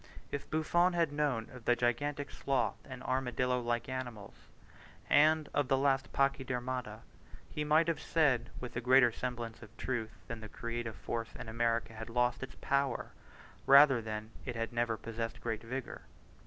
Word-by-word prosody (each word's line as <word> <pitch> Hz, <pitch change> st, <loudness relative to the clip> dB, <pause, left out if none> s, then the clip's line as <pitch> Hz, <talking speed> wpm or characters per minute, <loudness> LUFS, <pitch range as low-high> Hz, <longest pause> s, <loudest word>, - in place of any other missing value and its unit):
If 140 Hz, -, -4 dB
Buffon 175 Hz, +3 st, +2 dB
had 165 Hz, -4 st, +2 dB
known 140 Hz, -7 st, 0 dB
of 125 Hz, -3 st, -12 dB
the 120 Hz, -, +4 dB
gigantic 140 Hz, +4 st, -1 dB
sloth 135 Hz, -2 st, 0 dB
and 130 Hz, -2 st, -8 dB
armadillo 125 Hz, -1 st, 0 dB
like 120 Hz, -1 st, -1 dB
animals, 120 Hz, -6 st, -5 dB, 0.7 s
and 155 Hz, +1 st, +5 dB
of 145 Hz, -2 st, +1 dB
the 135 Hz, -, +3 dB
lost 135 Hz, 0 st, +1 dB
Pachydermata, 130 Hz, -4 st, -1 dB, 0.5 s
he 150 Hz, -, -3 dB
might 155 Hz, +2 st, +4 dB
have 165 Hz, -, 0 dB
said 145 Hz, -7 st, +2 dB
with 125 Hz, -, -7 dB
a 120 Hz, -, -1 dB
greater 125 Hz, 0 st, +6 dB
semblance 120 Hz, -1 st, -5 dB
of 115 Hz, +1 st, -14 dB
truth 110 Hz, -5 st, -4 dB
that 115 Hz, -1 st, -6 dB
the 110 Hz, -, -8 dB
creative 115 Hz, -1 st, -4 dB
force 115 Hz, -1 st, -4 dB
in -, -, -7 dB
America 115 Hz, 0 st, 0 dB
had 110 Hz, +1 st, -7 dB
lost 120 Hz, +1 st, +1 dB
its 130 Hz, -, -7 dB
power, 140 Hz, -3 st, 0 dB, 0.6 s
rather 140 Hz, -2 st, +8 dB
than 110 Hz, 0 st, -5 dB
that -, -, -7 dB
it 120 Hz, -, -3 dB
had 115 Hz, 0 st, -3 dB
never 120 Hz, -1 st, 0 dB
possessed 115 Hz, 0 st, -5 dB
great 110 Hz, -2 st, -3 dB
vigour. 130 Hz, +3 st, -5 dB
125 Hz, 170 wpm, -33 LUFS, 115-140 Hz, 0.7 s, rather